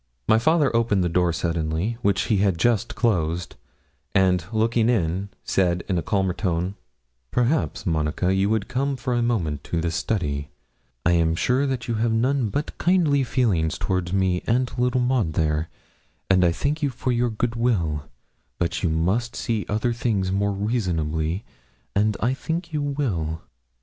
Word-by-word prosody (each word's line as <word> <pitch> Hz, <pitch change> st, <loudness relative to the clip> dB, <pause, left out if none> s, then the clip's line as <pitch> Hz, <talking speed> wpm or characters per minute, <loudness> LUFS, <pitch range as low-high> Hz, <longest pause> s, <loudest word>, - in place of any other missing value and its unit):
My 110 Hz, -, +5 dB
father 150 Hz, 0 st, +3 dB
opened 110 Hz, -5 st, +2 dB
the 90 Hz, -, +1 dB
door 90 Hz, 0 st, +2 dB
suddenly, 85 Hz, +5 st, -1 dB
which 100 Hz, -4 st, +2 dB
he 105 Hz, -, +1 dB
had 95 Hz, -3 st, +2 dB
just 120 Hz, +4 st, +1 dB
closed, 90 Hz, -7 st, 0 dB, 0.6 s
and 90 Hz, -3 st, +3 dB
looking 115 Hz, +1 st, +2 dB
in, 95 Hz, -3 st, 0 dB
said, 90 Hz, -2 st, +1 dB
in 90 Hz, -3 st, +1 dB
a -, -, -1 dB
calmer 95 Hz, +2 st, 0 dB
tone 90 Hz, -1 st, -1 dB, 0.6 s
'Perhaps, 125 Hz, -, 0 dB
Monica, 80 Hz, +2 st, 0 dB
you 95 Hz, +1 st, +2 dB
would 110 Hz, -2 st, 0 dB
come 135 Hz, +2 st, -1 dB
for 125 Hz, 0 st, -2 dB
a 120 Hz, -, +1 dB
moment 85 Hz, -, -1 dB
to 85 Hz, -, -1 dB
the 85 Hz, 0 st, -1 dB
study; 75 Hz, -7 st, -2 dB, 0.6 s
I'm 85 Hz, -1 st, +3 dB
sure 125 Hz, +9 st, +1 dB
you 125 Hz, -3 st, -2 dB
have 115 Hz, +1 st, +1 dB
none 125 Hz, +1 st, +1 dB
but 145 Hz, +7 st, -3 dB
kindly 160 Hz, -6 st, +3 dB
feelings 100 Hz, -12 st, +1 dB
towards 90 Hz, -2 st, -1 dB
me 95 Hz, -2 st, +1 dB
and 125 Hz, +2 st, +1 dB
little 125 Hz, +1 st, +1 dB
Maud, 125 Hz, -10 st, +1 dB
there; 80 Hz, 0 st, 0 dB, 0.6 s
and 95 Hz, -1 st, +5 dB
I 85 Hz, -, +4 dB
thank 145 Hz, -, -1 dB
you 145 Hz, -, +2 dB
for 125 Hz, 0 st, -2 dB
your 120 Hz, 0 st, +1 dB
good 115 Hz, +1 st, -2 dB
will; 85 Hz, -, 0 dB, 0.5 s
but 85 Hz, -, -1 dB
you 90 Hz, -, +1 dB
must 95 Hz, +10 st, 0 dB
see 110 Hz, -3 st, -2 dB
other 110 Hz, +3 st, 0 dB
things 105 Hz, -6 st, 0 dB
more 100 Hz, +1 st, +1 dB
reasonably, 90 Hz, -5 st, -1 dB, 0.5 s
and 105 Hz, 0 st, +2 dB
I 120 Hz, +3 st, +2 dB
think 165 Hz, +5 st, -4 dB
you 150 Hz, -, 0 dB
will.' 100 Hz, -, -2 dB
100 Hz, 165 wpm, -24 LUFS, 85-120 Hz, 0.6 s, My